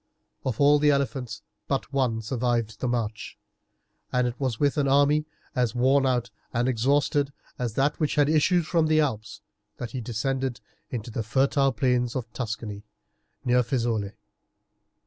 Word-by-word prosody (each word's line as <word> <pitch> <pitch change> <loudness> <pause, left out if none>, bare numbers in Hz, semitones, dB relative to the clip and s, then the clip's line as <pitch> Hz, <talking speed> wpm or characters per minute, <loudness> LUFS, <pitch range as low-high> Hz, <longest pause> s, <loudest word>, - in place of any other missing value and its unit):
Of 125 -4 -2
all 145 +1 +6
the 150 0 +4
elephants 135 -6 -1 0.2
but 135 0 -2
one 120 -5 +1
survived 115 -2 -1
the 125 - -1
march, 115 -3 -3 0.7
and 125 0 +2
it 120 - -2
was 130 -6 -1
with 145 -1 +2
an 145 -1 +2
army 145 +2 +4 0.3
as 125 -2 +1
worn 135 +2 +3
out 120 -3 0 0.2
and 120 +2 0
exhausted 140 +3 +2 0.3
as 120 -4 -2
that 145 +2 +1
which 155 -3 0
had 145 -1 +4
issued 160 +3 +3
from 165 -1 +2
the 155 0 +3
Alps 110 -8 -2 0.4
that 120 -3 -5
he 130 - -4
descended 130 +2 -2 0.3
into 120 -1 -5
the 115 - -2
fertile 135 +4 +2
plains 125 -1 +1
of 115 -4 -4
Tuscany, 110 -3 -5 0.6
near 125 0 +4
Fiesole. 115 -4 -1
125 Hz, 155 wpm, -26 LUFS, 115-140 Hz, 0.7 s, all